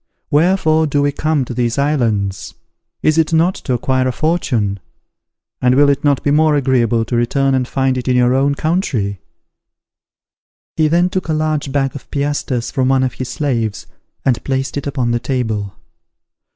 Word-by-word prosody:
Wherefore 160 0 +3
do 145 0 0
we 145 - +2
come 150 -1 0
to 125 - -6
these 120 0 -1
islands? 115 - -1 0.5
Is 155 +1 +3
it 160 0 +1
not 165 +3 +3
to 130 - -4
acquire 130 +1 0
a - - +1
fortune? 125 - -1 0.8
And 125 0 +3
will 145 +1 +5
it 140 0 -2
not 145 -2 +2
be 145 - +1
more 155 0 +3
agreeable 120 -5 +1
to 120 - -3
return 135 +3 +1
and 130 -1 0
find 130 -1 0
it 125 - -7
in 125 - +2
your 125 0 +3
own 140 +2 +2
country?" 125 - -1 1.5
He 155 -1 +2
then 175 +3 +2
took 185 -2 -2
a 160 - 0
large 155 -2 -1
bag 135 -1 0
of 140 - -10
piastres 140 -4 -2
from 130 -3 0
one 135 -1 +3
of 130 -2 -1
his 130 -1 -6
slaves, 120 -8 -2 0.4
and 125 -3 +1
placed 135 0 -2
it 145 0 -3
upon 130 -4 -1
the 120 - 0
table. 110 -7 -3
135 Hz, 180 wpm, -17 LUFS, 125-150 Hz, 1.5 s, will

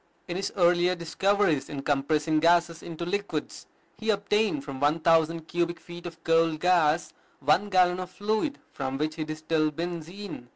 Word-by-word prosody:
In 175 - -4
his 195 - -2
earlier 175 0 +4
discoveries 175 -2 +1
in 140 -2 -5
compressing 150 +2 +1
gases 170 0 +3
into 170 0 -6
liquids, 190 -4 -4 0.3
he 225 - -3
obtained 205 -6 +1
from 140 -2 -7
one 145 +3 +2
thousand 165 0 +3
cubic 170 0 -1
feet 175 0 -9
of 165 -1 -11
coal 165 -1 +3
gas 170 -1 +2 0.3
one 160 +9 +2
gallon 180 -1 +3
of 185 -1 -5
fluid 215 +10 -1
from 135 -1 -4
which 155 +2 -1
he 155 - -1
distilled 155 0 -1
benzine. 170 -2 -6
170 Hz, 160 wpm, -27 LUFS, 155-180 Hz, 0.3 s, earlier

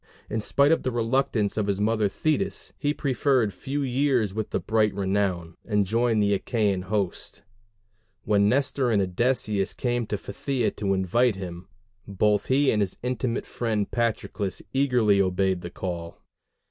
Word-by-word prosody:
In 110 +1 -1
spite 140 +7 +3
of 165 - +3
the 130 - -1
reluctance 115 -3 0
of 105 -2 0
his 100 -1 0
mother 105 0 +2
Thetis 155 - -1
he 145 - +1
preferred 130 -6 +1
few 140 +10 -3
years 130 -5 +1
with 110 0 -3 0.2
bright 110 -2 +2
renown, 95 -4 -1
and 105 -2 +1
joined 115 +1 +2
the 100 0 +3
Achæan 100 -6 0
host. 100 -2 -3 0.8
When 100 -1 +3
Nestor 135 0 +1
and 110 -3 +3
Odysseus 100 +1 0
came 120 -2 -1
to 105 - -2
Phthia 135 +2 -2
to 100 -2 0
invite 105 +5 +2
him, 90 -1 -7 0.4
both 105 +1 +1
he 135 +1 +3
and 105 - +1
his 95 -2 -2
intimate 125 -1 -2
friend 110 -4 -2
Patroclus 110 -4 -2
eagerly 125 -7 +3
obeyed 95 -1 +1
the 85 - -6
call. 85 -2 -5
105 Hz, 150 wpm, -26 LUFS, 100-125 Hz, 0.8 s, spite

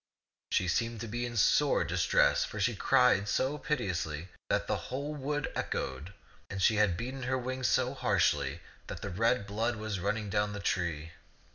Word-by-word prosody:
She 90 - +1
seemed 115 +5 0
to 115 - -4
be 120 +2 -2
in 120 -1 -6
sore 145 +7 +4
dis 90 0 0
tress; - - +4
for - - -5
she - - +1
cried 100 +1 +3
so 140 +6 0
piteously 90 - -2 0.2
that - - +1
the - - 0
whole 140 +4 -3
wood 145 +1 -2
echoed, 65 +8 -3 0.4
and 95 - -5
she 105 +3 +4
had 105 -5 +3
beaten 130 +3 -5
her 130 +1 0
wings 130 0 -2
so - - +2
harshly - - +1 0.3
that - - -7
the 100 - -4
red 115 +3 +1
blood 110 +4 -1
was 110 -2 -4
running 100 +2 -2
down 105 0 +1
the 105 - -5
tree. 85 -5 -2
110 Hz, 180 wpm, -31 LUFS, 95-125 Hz, 0.4 s, sore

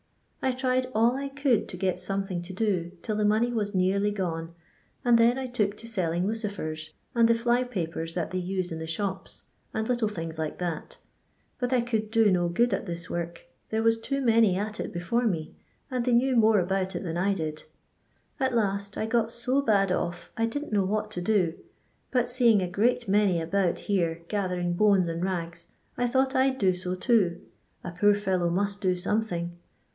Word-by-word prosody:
I 260 - +2
tried 255 0 0
all 230 +3 +4
I 275 +1 -3
could 275 -5 +1
to - - -6
get 185 -2 0
something 195 -2 -2
to 180 +2 -8
do, 185 -4 -1
till 215 - -2
the 210 - 0
money 220 +4 +2
was 205 -3 -2
nearly 195 +3 +2
gone; 170 -5 -3 0.5
and 240 -1 +6
then 235 +2 +4
I 265 - -3
took 210 -5 -1
to 230 - -8
selling 180 -5 -1
lucifers, 195 -8 -4 0.2
and 230 -1 +5
the 230 - +4
fly 240 +2 +2
papers 165 -8 -4
that 175 -3 -2
they 185 - -1
use 185 0 -2
in 160 - -4
the 160 - -5
shops, 190 +3 -4 0.3
and 220 0 -1
little 240 -3 +1
things 165 -5 -5
like 155 -1 -3
that; 175 -3 -4 0.6
but 245 0 -1
I 255 -2 +3
could 220 -3 -1
do 225 -2 +4
no 175 -2 +2
good 235 +6 +2
at 195 - -2
this 170 0 -5
work, 170 0 -4 0.2
there 220 0 0
was 225 0 +3
too 275 +5 -2
many 225 -6 +4
at 215 +2 -3
it - - -3
before 230 +8 0
me, 165 -7 -2 0.4
and 250 -2 0
they 250 0 +1
knew 255 +2 +3
more 220 -2 +5
abont 190 0 -1
it - - -3
than 165 -3 -3
I 195 +3 +1
did. 155 -3 -4 0.7
At 260 -3 +1
last, 200 -2 -1
1 220 - -1
got 230 -1 +1
so 250 +4 0
bad 200 -7 +2
off 175 -1 -2
I 225 0 +1
didn't 290 +1 -4
know 200 -2 +3
what 215 +2 -1
to 180 - -4
do; 180 -4 +2 0.6
but 245 -2 +1
seeing 240 -5 +4
a - - -1
great 235 +6 +1
many 195 -3 +3
about 175 +2 0
here 170 -4 -1
gathering 180 -3 -1
bones 195 -1 +4
and 165 +1 -3
rags, 170 -2 -3 0.3
I 245 - +1
thought 265 +2 +2
I 260 +1 +4
*d 260 - -4
do 190 -6 +3
so 180 0 -3
too 185 -5 +2 0.2
— - - -42
a - - -5
poor 205 +4 +4
fellow 185 -4 0
must 200 +3 -1
do 185 -2 +2
something. 180 -3 -2
200 Hz, 205 wpm, -27 LUFS, 175-230 Hz, 0.7 s, and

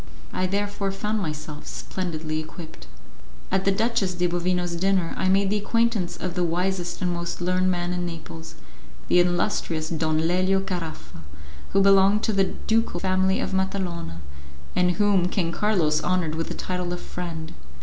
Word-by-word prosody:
I 185 - 0
therefore 200 0 -1
found 210 +3 -1
myself 155 -4 -5
splendidly 160 -4 -3
equipped. 155 - -9 0.6
At 190 0 +1
the 195 - +5
Duchess 215 -3 +1
de 180 0 +1
Bovino's 175 0 0
dinner 185 -1 +1
I 185 - +1
made 195 +1 +3
the 210 - +2
acquaintance 230 -4 +1
of 180 -2 -3
the 180 - 0
wisest 175 +1 -1
and 180 -1 +1
most 170 0 -3
learned 185 +1 +2
man 175 -1 0
in 180 0 -2
Naples, 165 -1 -8 0.5
the 180 - +6
illustrious 175 -3 +1
Don 155 -1 0
Lelio 185 +2 +3
Caraffa, 175 - -5 0.5
who 195 - +5
belonged 195 +2 +5
to 220 - +1
the 195 -1 +4
ducal 220 -2 0
family 190 +1 +2
of - - -2
Matalona, 180 - -2 0.5
and 180 0 +3
whom 200 -2 +3
King 180 -3 0
Carlos 170 -7 +2
honoured 175 -1 +1
with 165 +1 -2
the - - -5
title 180 -1 -2
of 175 - -4
friend. 165 -2 -6
180 Hz, 160 wpm, -25 LUFS, 170-195 Hz, 0.6 s, the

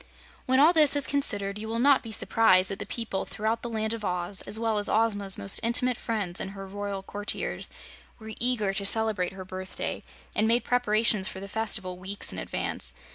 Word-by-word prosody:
When 260 +1 +3
all 310 +5 +6
this 305 -3 +5
is 285 -2 +3
considered, 205 -8 0
you 220 - -6
will 225 +1 -3
not 275 +2 +4
be 225 - -9
surprised 195 -4 +3
that 195 - -3
the - - -5
people 225 -5 -3
throughout 220 +1 -2
the 240 - -5
Land 220 -1 -2
of 225 -2 -6
Oz, 180 0 -1
as 215 - -1
well 225 -2 0
as 205 - 0
Ozma's 205 -3 +3
most 195 - +2
intimate 245 +2 +2
friends 210 -7 -3
and 190 - -5
her 195 - -7
royal 200 0 -5
courtiers, 205 +1 -3 0.5
were 220 -1 -9
eager 230 -5 +1
to 200 +1 -1
celebrate 205 -3 +1
her 190 -1 -9
birthday, 185 0 -5 0.3
and 215 0 +1
made 235 +2 +3
preparations 220 -4 +2
for 190 - -6
the 200 - -8
festival 195 -4 -2
weeks 195 +2 -1
in - - -5
advance. - - -3
215 Hz, 200 wpm, -27 LUFS, 195-230 Hz, 0.5 s, all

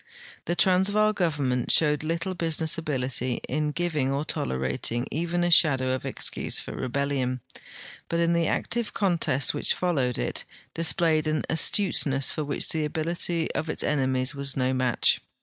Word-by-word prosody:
The 175 - -1
Transvaal 200 +4 +3
government 145 - -1
showed 150 -1 +3
little 170 +4 -2
business 165 -2 0
ability 130 -5 -1
in 150 0 -1
giving 155 -5 -1
or 140 +2 -2
tolerating 65 - -2
even 175 +2 -1
a 175 - +1
shadow 135 -6 +4
of 130 - -4
excuse - - -1
for - - -7
rebellion, 130 -1 -2 0.7
but 170 - 0
in 170 0 +2
the 170 -1 +1
active 235 -2 -1
contest 170 -8 +2
which 145 - 0
followed 140 -9 0
it - - -2 0.3
displayed 165 -2 +2
an 155 0 0
astuteness 155 -5 +2
for 155 - -3
wdiich 145 -1 -2
the 160 -1 0
ability 165 +2 -2
of 160 - -3
its - - -2
enemies 130 -2 0
was 140 -1 -2
no 130 0 +1
match. 130 -2 +2
155 Hz, 150 wpm, -26 LUFS, 130-170 Hz, 0.7 s, shadow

